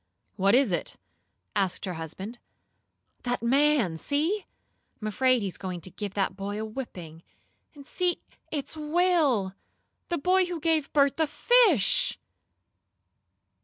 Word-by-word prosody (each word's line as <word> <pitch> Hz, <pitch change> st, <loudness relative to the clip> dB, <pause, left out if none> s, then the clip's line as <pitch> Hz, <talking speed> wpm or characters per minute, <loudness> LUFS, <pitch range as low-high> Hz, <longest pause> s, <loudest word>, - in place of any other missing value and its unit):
"What 195 Hz, +3 st, +3 dB
is 260 Hz, -5 st, +3 dB
it?" 175 Hz, -, -2 dB, 0.6 s
asked 195 Hz, -1 st, 0 dB
her 185 Hz, -, -3 dB
husband. 190 Hz, +8 st, -7 dB, 0.8 s
"That 245 Hz, -1 st, -2 dB
man! 260 Hz, -, +3 dB
See! 320 Hz, -, 0 dB, 0.5 s
I'm 215 Hz, -, -7 dB
afraid 255 Hz, +2 st, +2 dB
he -, -, -1 dB
is 185 Hz, -, -7 dB
going 185 Hz, -2 st, -4 dB
to 185 Hz, -, -5 dB
give 205 Hz, 0 st, -6 dB
that 195 Hz, -2 st, 0 dB
boy 200 Hz, +1 st, -4 dB
a 220 Hz, -, -3 dB
whipping. 180 Hz, -9 st, -8 dB, 0.5 s
And 280 Hz, -1 st, -12 dB
see, 360 Hz, +2 st, 0 dB, 0.3 s
it's 295 Hz, 0 st, -4 dB
Will 305 Hz, -, +2 dB, 0.6 s
the 345 Hz, -, 0 dB
boy 365 Hz, +5 st, +3 dB
who 350 Hz, -2 st, -4 dB
gave 315 Hz, -2 st, +1 dB
Bert 280 Hz, -2 st, +3 dB
the 320 Hz, -1 st, +2 dB
fish!" 355 Hz, -, +4 dB
255 Hz, 135 wpm, -27 LUFS, 195-310 Hz, 0.8 s, fish